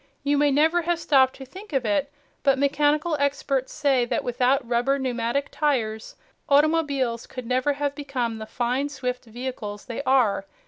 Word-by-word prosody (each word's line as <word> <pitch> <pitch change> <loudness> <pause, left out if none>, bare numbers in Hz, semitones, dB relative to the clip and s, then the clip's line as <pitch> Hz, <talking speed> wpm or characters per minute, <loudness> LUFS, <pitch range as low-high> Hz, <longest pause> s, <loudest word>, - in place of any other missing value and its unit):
You 285 +1 +2
may 290 0 +4
never 315 +5 +3
have 345 0 0
stopped 265 -5 +3
to 270 - -10
think 380 +7 -12
of 265 -3 0
it, 265 +7 0 0.3
but 275 -1 +3
mechanical 295 +3 +2
experts 275 -2 0
say 275 -4 +2
that - - -2
without 250 +2 +1
rubber 245 +4 +1
pneumatic 255 +1 -1
tires, 230 -8 -1 0.3
automobiles 280 -5 +2
could 255 -2 -8
never 255 +4 +1
have 285 0 -2
become 255 -6 -3
the 220 - -7
fine, 250 +5 -1
swift 250 -3 -4
vehicles 225 -3 -6
they 240 -1 -4
are. 245 -8 +2
270 Hz, 165 wpm, -24 LUFS, 245-285 Hz, 0.3 s, may